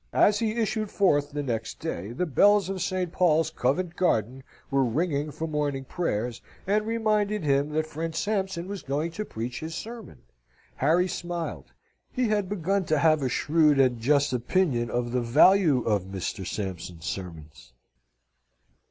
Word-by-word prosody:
As 205 0 +5
he 220 -2 0
issued 215 -1 -1
forth 145 -9 +2
the 145 0 -4
next 115 -4 -3
day, 115 -10 -4
the 155 +10 -1
bells 200 +5 +4
of 190 -2 -3
St. 185 -2 -1
Paul's, 160 -3 +2
Covent 165 +6 -1
Garden, 130 - 0 0.3
were 135 0 +3
ringing 145 +4 0
for 160 +2 -5
morning 145 -3 -2
prayers, 120 - -2 0.2
and 210 +2 +1
reminded 215 -3 0
him 140 0 +2
that 155 0 +1
friend 160 +1 -5
Sampson 190 -3 -2
was 200 -2 -5
going 150 +5 -2
to 210 +6 -4
preach 115 - -5
his 160 0 -6
sermon. 230 0 -8 0.5
Harry 165 +6 +3
smiled. 175 -2 -5 0.4
He 250 -3 0
had 205 -3 0
begun 195 0 0
to 155 0 +1
have 155 0 +3
a 130 - 0
shrewd 150 +1 +3
and 125 -3 +3
just 140 +3 +2
opinion 125 -1 +1
of 120 0 -2
the 125 0 0
value 150 +3 +5
of 105 -4 0
Mr. 95 -1 -5
Sampson's 90 -4 -5
sermons. 80 -9 -7
155 Hz, 160 wpm, -26 LUFS, 125-185 Hz, 0.5 s, As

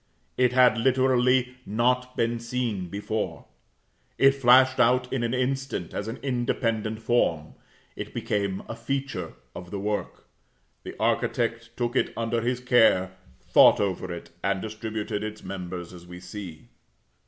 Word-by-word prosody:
It 125 -1 +3
had 125 -3 +5
literally 125 0 +2
not 125 +4 0
been 115 0 0
seen 115 -5 -3
before. 105 +4 -4 0.7
It 135 0 +6
flashed 130 0 +5
out 125 +1 +3
in 130 - 0
an 120 +1 0
instant 130 -7 -2
as 105 - -4
an 115 - -5
independent 115 -4 -1
form. 85 -10 +1 0.4
It - - -6
became 100 -2 -2
a - - -5
feature 135 -10 -4 0.2
of 90 0 -9
the 100 - -4
work. 105 +1 -3 0.6
The - - -8
architect 115 0 -1
took 120 0 -1
it - - +1
under 115 0 -1
his 120 +2 -1
care, 115 -7 +4 0.3
thought - - +6
over 95 -2 -2
it, 85 - -8
and 100 -1 +1
distributed 110 -1 -4
its 110 0 -6
members 90 -2 -6
as 90 -1 -12
we 90 0 -9
see. 90 -3 -9
115 Hz, 140 wpm, -26 LUFS, 100-125 Hz, 0.7 s, It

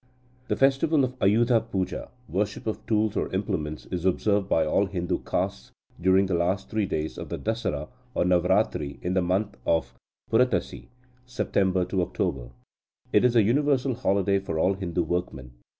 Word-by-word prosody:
The - - 0
festival 140 +2 +3
of 130 0 -1
Ayudha 115 +4 +4
Puja 95 -3 -3 0.2
(worship 100 +2 -2
of 110 - -3
tools 110 -2 +1
or - - -1
implements) 90 -6 -3
is 90 -2 -3
observed 100 +2 +1
by 80 - +3
all 95 +6 +2
Hindu 90 -3 -2
castes - - -3 0.3
during 95 +2 +4
the 95 - -2
last 90 +3 0
three 110 -2 0
days 75 -5 -3
of - - -7
the - - -3
Dasara 105 -10 -2 0.3
or - - +2
Navarathri 85 -5 +1
in 90 - -1
the 95 - +2
month 95 +4 -1
of 70 -7 0 0.4
Purattasi 115 -6 +1 0.4
(September 95 -5 0
October). 90 -9 -2 0.6
It - - +5
is 125 -1 +3
a 115 - +6
universal 135 +3 +2
holiday 100 -5 +1
for 95 -4 -4
all 95 +4 +3
Hindu 90 -3 -2
workmen. 80 -7 -3
95 Hz, 160 wpm, -26 LUFS, 90-110 Hz, 0.6 s, a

